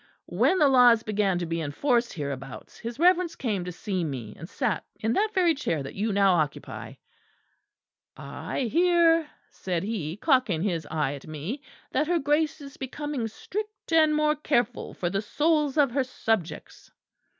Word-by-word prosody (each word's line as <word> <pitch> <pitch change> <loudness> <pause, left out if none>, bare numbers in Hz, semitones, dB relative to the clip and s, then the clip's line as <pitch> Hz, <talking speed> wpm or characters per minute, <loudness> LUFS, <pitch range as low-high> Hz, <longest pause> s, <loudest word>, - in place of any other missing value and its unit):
When 375 - +2
the 300 - +5
laws 245 -4 +6
began 205 -4 0
to 175 - -2
be 165 0 -2
enforced 235 - 0
hereabouts, 135 -4 -7
his 235 0 -6
Reverence 355 +1 +3
came 210 -8 -2
to 180 - -4
see 185 +1 -3
me; 125 -9 -5
and 165 +4 -10
sat 245 -8 -1 0.2
in 220 +1 0
that 430 - +2
very 355 -3 +4
chair 165 - -2
that 135 - -7
you 210 +3 -1
now 195 -1 +4
occupy. 155 -4 -3 1.2
"'I - - -5
hear,' 335 -2 +4 0.2
said 180 -2 -3
he, 190 -6 -3
cocking 250 - +2
his 170 -7 -2
eye 150 -3 -1
at 140 +1 -10
me, 155 - -5 0.3
'that 295 +3 +1
her 350 0 +2
Grace 300 +1 0
is 275 -1 -11
becoming 270 -2 -4
strict, 410 - -6
and 310 -2 +5
more 300 0 +2
careful 245 -5 -1
for 175 -1 -2
the 195 +1 0
souls 300 +5 +1
of 280 -4 +4
her 270 +2 +1
subjects.' 225 -8 -3
235 Hz, 165 wpm, -26 LUFS, -, 1.2 s, laws